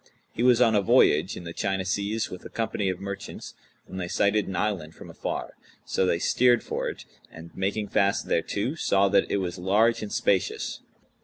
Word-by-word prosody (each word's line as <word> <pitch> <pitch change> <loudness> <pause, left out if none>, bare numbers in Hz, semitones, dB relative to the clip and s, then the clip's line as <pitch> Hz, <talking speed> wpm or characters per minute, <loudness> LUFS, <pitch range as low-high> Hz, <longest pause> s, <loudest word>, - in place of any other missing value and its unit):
He - - -4
was 125 -1 +5
on 115 -3 +4
a 105 - +4
voyage 90 -2 +3
in - - -8
the 85 -1 -7
China 95 -1 -1
seas 100 +3 -1
with 90 - -8
a - - -9
company 110 -3 -2
of 95 - -3
merchants, 100 0 -7 0.3
when 95 - -8
they 90 - -3
sighted 100 +3 +1
an 95 - -4
island 85 -5 -2
from - - -11
afar; - - -4 0.3
so 95 - 0
they 85 - +2
steered 120 +6 +3
for - - -3
it - - -9 0.3
and, 80 +1 -12
making 100 +2 -1
fast 100 0 +1
thereto, 105 +8 -1
saw 100 -11 +2
that 100 0 +2
it - - +1
was 90 -2 -3
large 105 +6 +2
and 105 -1 -5
spacious. 95 -2 0
100 Hz, 200 wpm, -26 LUFS, 95-110 Hz, 0.3 s, was